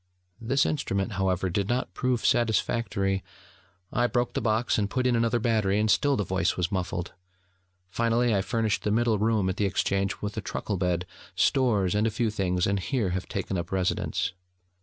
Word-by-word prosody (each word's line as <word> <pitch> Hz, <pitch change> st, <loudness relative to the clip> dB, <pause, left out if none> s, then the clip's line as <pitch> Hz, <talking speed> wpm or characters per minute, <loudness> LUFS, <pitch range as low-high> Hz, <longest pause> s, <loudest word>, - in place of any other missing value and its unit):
(This 135 Hz, +5 st, +2 dB
instrument, 100 Hz, -8 st, -1 dB
however, 95 Hz, -1 st, 0 dB
did 100 Hz, +3 st, -1 dB
not 125 Hz, +2 st, -1 dB
prove 125 Hz, -2 st, -1 dB
satisfactory: 110 Hz, -4 st, +1 dB, 0.7 s
I 120 Hz, +1 st, +2 dB
broke 120 Hz, 0 st, -1 dB
the -, -, -1 dB
box, 110 Hz, +1 st, +1 dB
and 100 Hz, -1 st, 0 dB
put 130 Hz, +3 st, -1 dB
in 125 Hz, -1 st, +3 dB
another 115 Hz, +1 st, +2 dB
battery, 110 Hz, -3 st, +1 dB
and 110 Hz, 0 st, +2 dB
still 145 Hz, -2 st, +3 dB
the 105 Hz, -, 0 dB
voice 95 Hz, +1 st, 0 dB
was 90 Hz, -1 st, -1 dB
muffled: 90 Hz, -2 st, -3 dB, 0.7 s
finally, 115 Hz, +3 st, +1 dB
I 100 Hz, -, +2 dB
furnished 110 Hz, +2 st, 0 dB
the -, -, -1 dB
middle 110 Hz, 0 st, +2 dB
room 110 Hz, -2 st, +2 dB
at 95 Hz, -, -2 dB
the 105 Hz, -, +1 dB
Exchange 100 Hz, +1 st, 0 dB
with 105 Hz, 0 st, -4 dB
a 110 Hz, -, -2 dB
truckle 100 Hz, +1 st, -3 dB
bed, 90 Hz, -1 st, 0 dB, 0.3 s
stores, 105 Hz, -9 st, +2 dB
and 105 Hz, +2 st, +2 dB
a -, -, +2 dB
few 110 Hz, +1 st, -1 dB
things, 90 Hz, -4 st, 0 dB
and 100 Hz, 0 st, +1 dB
here 110 Hz, -2 st, -1 dB
have 95 Hz, +1 st, -3 dB
taken 95 Hz, -1 st, -3 dB
up 85 Hz, +1 st, -6 dB
residence.) 95 Hz, 0 st, -1 dB
105 Hz, 185 wpm, -27 LUFS, 95-115 Hz, 0.7 s, in